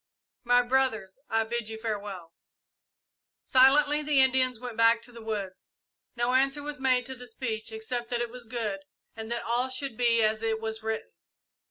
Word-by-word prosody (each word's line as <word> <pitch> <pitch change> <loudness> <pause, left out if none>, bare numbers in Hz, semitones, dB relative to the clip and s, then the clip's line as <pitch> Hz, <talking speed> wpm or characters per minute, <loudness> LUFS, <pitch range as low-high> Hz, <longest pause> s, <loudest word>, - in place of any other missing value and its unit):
My 245 0 +4
brothers, 245 -5 0
I 225 0 +2
bid 230 0 -3
you 220 - -6
farewell." 200 -6 -5 1.1
Silently 290 +3 +5
the 295 -2 +3
Indians 260 -2 +3
went 245 -2 -7
back 230 +1 +4
to - - -9
the 235 -1 -11
woods. 205 -4 -5 0.4
No 240 +1 0
answer 270 +2 +2
was 295 -1 -6
made 255 -2 +2
to 265 - -6
the 250 -1 -11
speech 225 -1 -4
except 235 +2 -4
that 240 - -1
it 240 -1 -3
was 250 -1 -10
good, 220 -4 -3 0.4
and 220 +1 -7
that 235 - -2
all 245 +3 0
should 260 -3 -4
be 235 -2 +3
as 215 0 +1
it 225 -1 -1
was 220 0 -5
written. 220 0 -4
235 Hz, 180 wpm, -28 LUFS, 220-255 Hz, 1.1 s, Silently